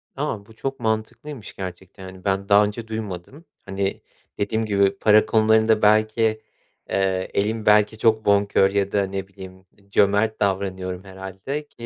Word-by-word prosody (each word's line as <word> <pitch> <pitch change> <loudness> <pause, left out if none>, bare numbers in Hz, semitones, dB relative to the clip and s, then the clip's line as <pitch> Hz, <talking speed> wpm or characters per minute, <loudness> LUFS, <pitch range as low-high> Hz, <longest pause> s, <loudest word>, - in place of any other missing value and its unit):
Tamam, 100 -2 -3
bu 110 - -17
çok 135 +4 -5
mantıklıymış 110 +3 -4
gerçekten, 95 0 -8
yani, 95 0 -13
ben 100 +1 -1
daha 100 +1 +6
önce 110 +2 -6
duymadım. 110 - -7 0.2
Hani, 95 0 -3 0.4
dediğim 110 +2 -1
gibi 100 -2 +2
para 105 0 +5
konularında 110 0 +3
belki, 110 +1 +2 0.5
eee, 95 -1 -1
elim 110 +2 -1
belki 105 +1 +4
çok 110 -1 +2
bonkör 100 -1 +3
ya 100 0 -1
da 100 -1 +1
ne 95 0 -5
bileyim, 95 -1 -13
iii, 100 0 -27
cömert 100 +2 +2
davranıyorum 95 -2 -2
herhâlde 95 +10 -7
ki, 120 -4 -11
100 Hz, 150 wpm, -22 LUFS, 95-110 Hz, 0.5 s, daha